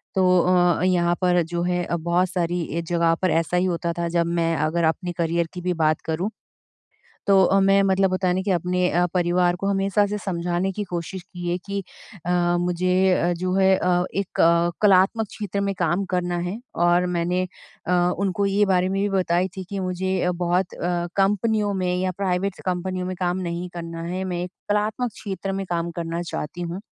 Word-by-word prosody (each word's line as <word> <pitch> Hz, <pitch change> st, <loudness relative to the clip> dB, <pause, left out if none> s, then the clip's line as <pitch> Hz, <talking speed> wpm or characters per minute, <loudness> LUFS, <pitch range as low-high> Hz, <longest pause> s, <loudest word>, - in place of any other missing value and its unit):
तो 185 Hz, -1 st, +4 dB
अ, 180 Hz, -1 st, +3 dB
यहाँ 175 Hz, -2 st, +2 dB
पर 180 Hz, -1 st, +3 dB
जो 170 Hz, +1 st, -3 dB
है 180 Hz, 0 st, 0 dB
अ, -, -, -1 dB
बहुत 170 Hz, +2 st, +1 dB
सारी 175 Hz, -2 st, -1 dB, 0.2 s
ए 170 Hz, -, 0 dB
जगह 170 Hz, 0 st, +1 dB
पर 185 Hz, -, +2 dB
ऐसा 165 Hz, +2 st, +1 dB
ही 180 Hz, -, +2 dB
होता 170 Hz, -1 st, -1 dB
था। 170 Hz, -, -1 dB
जब 170 Hz, 0 st, +1 dB
मैं 165 Hz, 0 st, +1 dB
अगर 170 Hz, +2 st, 0 dB
अपने 165 Hz, +2 st, 0 dB
करियर 170 Hz, 0 st, 0 dB
की 180 Hz, -, -6 dB
भी 180 Hz, 0 st, 0 dB
बात 155 Hz, -2 st, +1 dB
करूँ। 170 Hz, +6 st, -1 dB, 1.0 s
तो 195 Hz, -2 st, +6 dB
अ, 195 Hz, +2 st, +3 dB
मैं 195 Hz, +1 st, +4 dB
मतलब 195 Hz, -1 st, +2 dB
होता 185 Hz, 0 st, 0 dB
है 180 Hz, -, +2 dB
ना 190 Hz, -, 0 dB
कि 200 Hz, -, -2 dB
अपने 180 Hz, 0 st, +1 dB
अ, 175 Hz, +1 st, +2 dB
परिवार 175 Hz, 0 st, +2 dB
को 195 Hz, -, -4 dB
हमेशा 200 Hz, +1 st, +2 dB
से 210 Hz, +1 st, -3 dB
समझाने 175 Hz, 0 st, -1 dB
की 210 Hz, +2 st, -4 dB
कोशिश 175 Hz, +1 st, -4 dB
की 175 Hz, -1 st, -7 dB
है 175 Hz, -, +1 dB
कि 200 Hz, 0 st, -3 dB, 0.4 s
अ, 175 Hz, -, 0 dB, 0.3 s
मुझे 180 Hz, 0 st, +2 dB
जो 185 Hz, +1 st, -1 dB
है 190 Hz, 0 st, +4 dB
अ, 180 Hz, -1 st, +1 dB
एक 195 Hz, -1 st, -2 dB
अ, 170 Hz, +1 st, +4 dB
कलात्मक 205 Hz, +2 st, +4 dB
क्षेत्र 205 Hz, -2 st, -4 dB
में 200 Hz, 0 st, -1 dB
काम 180 Hz, +3 st, +1 dB
करना 175 Hz, -1 st, 0 dB
है। 205 Hz, -, -4 dB, 0.3 s
और 175 Hz, +1 st, +3 dB
मैंने 180 Hz, +2 st, 0 dB, 0.4 s
अ, 180 Hz, -, 0 dB, 0.3 s
उनको 200 Hz, 0 st, 0 dB
ये 200 Hz, +1 st, +3 dB
बारे 185 Hz, -1 st, +2 dB
में 195 Hz, +1 st, -1 dB
भी 205 Hz, -, +1 dB
बताई 180 Hz, +1 st, +1 dB
थी 190 Hz, -, -5 dB
कि 200 Hz, -1 st, -3 dB
मुझे 185 Hz, 0 st, -1 dB
बहुत 175 Hz, +1 st, 0 dB
अ, 175 Hz, 0 st, -1 dB
कंपनियों 205 Hz, +1 st, +2 dB
में 180 Hz, -1 st, 0 dB
या 185 Hz, 0 st, 0 dB
प्राइवेट्स 190 Hz, 0 st, -1 dB
कंपनियों 185 Hz, 0 st, -2 dB
में 185 Hz, -1 st, -4 dB
काम 180 Hz, 0 st, 0 dB
नहीं 175 Hz, +1 st, -4 dB
करना 165 Hz, -1 st, -6 dB
है। 180 Hz, +3 st, -3 dB
मैं 175 Hz, -2 st, -3 dB
एक 180 Hz, -, -5 dB, 0.2 s
कलात्मक 215 Hz, +4 st, 0 dB
क्षेत्र 195 Hz, -1 st, -5 dB
में 195 Hz, 0 st, -2 dB
काम 170 Hz, 0 st, -1 dB
करना 170 Hz, 0 st, -3 dB
चाहती 170 Hz, +1 st, -5 dB
हूँ। 175 Hz, +3 st, -4 dB
180 Hz, 205 wpm, -23 LUFS, 175-190 Hz, 1.0 s, तो